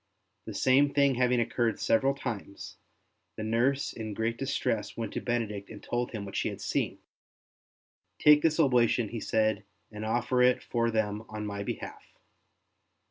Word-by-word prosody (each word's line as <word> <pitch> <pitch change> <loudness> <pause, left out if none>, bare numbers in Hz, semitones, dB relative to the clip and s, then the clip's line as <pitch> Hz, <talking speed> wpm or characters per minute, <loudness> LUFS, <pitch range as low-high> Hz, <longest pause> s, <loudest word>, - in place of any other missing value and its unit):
The - - -7
same 140 +2 +4
thing 140 -1 +4
having 125 0 +2
occurred 115 -1 0
several 135 +4 +2
times, 105 -7 -6 0.6
the 110 - -5
nurse 120 +6 +1
in 110 -2 -6
great 115 +2 -1
distress 130 -4 -2
went 115 -1 -4
to - - -3
Benedict 110 -4 -2
and 105 -2 -10
told 120 0 -2
him 105 -3 -6
what 100 - -8
she - - 0
had - - -7
seen. - - -1 0.7
*' - - -56
Take 150 0 +8
this 160 0 +2
oblation,'' 120 -6 +3
he 115 - -5
said, 110 -1 +1 0.2
'' - - -45
and 105 0 -7
offer 120 +3 +1
it 125 0 +4
for 115 -1 0
them 110 -2 -1
on 105 0 -5
my 100 -1 -4
behalf." - - -6
115 Hz, 170 wpm, -29 LUFS, 110-125 Hz, 0.7 s, Take